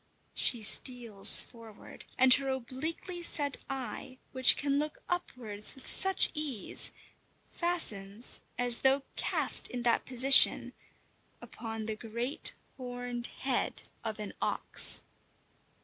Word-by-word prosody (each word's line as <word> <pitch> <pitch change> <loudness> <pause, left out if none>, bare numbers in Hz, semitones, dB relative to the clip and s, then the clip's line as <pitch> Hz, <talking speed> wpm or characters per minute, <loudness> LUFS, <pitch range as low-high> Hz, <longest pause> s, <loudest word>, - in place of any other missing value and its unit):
She 235 -3 +1
steals 230 -3 +4
forward, 225 -3 -15
and 260 0 +7
her 270 +1 +2
obliquely 290 +8 -6
set 290 -5 -1
eye, 260 0 -7
which 260 -1 +6
can 280 0 -1
look 300 0 -6
upwards 235 -12 0
with 265 - -12
such 385 0 +2
ease, 290 -8 -1 0.6
fastens, 225 - -3 0.2
as 245 -1 +5
though 270 +1 +1
cast - - -1
in 245 -1 -7
that 235 -1 0
position, 265 +1 +4 0.7
upon 225 -1 -9
the 220 0 -5
great 235 +5 -2 0.2
horned 245 -1 -6
head 260 -2 -4
of 220 -2 -6
an 210 -1 -8
ox. - - +1
250 Hz, 115 wpm, -29 LUFS, 230-275 Hz, 0.7 s, and